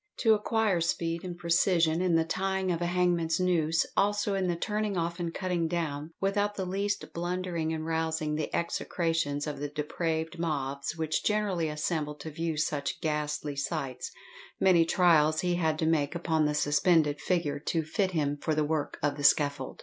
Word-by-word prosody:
To 225 -2 +6
acquire 210 -3 +1
speed 165 +1 -1
and 175 -2 -6
precision 170 -1 +2
in 180 -2 +2
the 165 - +4
tying 190 +2 -1
of 170 0 -2
a 175 - +1
hangman's 175 -2 +1
"noose," 165 -3 +2
also 205 0 +1
in 190 -1 0
the 175 - 0
"turning 210 +2 -2
off 170 +1 -2
and 170 -1 -2
cutting 175 -1 -1
down" 160 -3 -3
without 205 +1 0
the 190 - -3
least 200 +2 -2
blundering 175 -2 -2
and 160 -1 -3
rousing 160 -1 -1
the 155 0 -2
execrations 165 -4 -1
of 150 -2 -4
the 145 - -2
depraved 160 +2 -3
mobs 140 -3 -2
which 160 -1 -1
generally 200 -6 0
assemble 150 0 -2
to 160 +1 -8
view 165 +1 -2
such 150 -2 -1
ghastly 150 -1 -2
sights, 140 -2 -3 0.5
many 175 -3 +5
trials 160 -3 +4
he 180 -1 +1
had 160 -3 +1
to 160 - 0
make 155 -1 +1
upon 160 -3 +1
the 150 - -1
suspended 150 0 +2
figure 170 -6 0
to 160 +2 -1
fit 185 +5 0
him 145 -5 -1
for 155 +1 -1
the 155 - +2
work 150 -1 -2
of 145 0 +1
the 145 - -5
scaffold. 140 -1 +2
165 Hz, 180 wpm, -29 LUFS, 150-180 Hz, 0.5 s, To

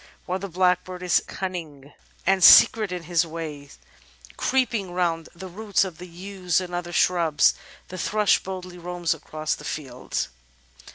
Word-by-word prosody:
While 185 +1 -2
the 200 - -5
Blackbird 180 0 0
is 180 - +3
cimning 155 -7 -6 0.3
and 190 0 +2
secret 215 +4 +8
in 180 -2 -4
his 170 +1 +1
ways, 155 -4 -8 0.6
creeping 230 -8 0
round 170 -3 -1
the 190 +2 -8
roots 200 +3 0
of 180 -4 -7
the 180 - -9
yews 180 0 -2
and 180 -1 -7
other 175 0 -4
shrubs, 170 -3 +3 0.4
the 185 - -7
Thrush 210 +3 +2
boldly 185 -1 -7
roams 175 -1 -2
across 155 0 -4
the - - -8
fields. 130 -4 -4
180 Hz, 150 wpm, -24 LUFS, 165-185 Hz, 0.6 s, secret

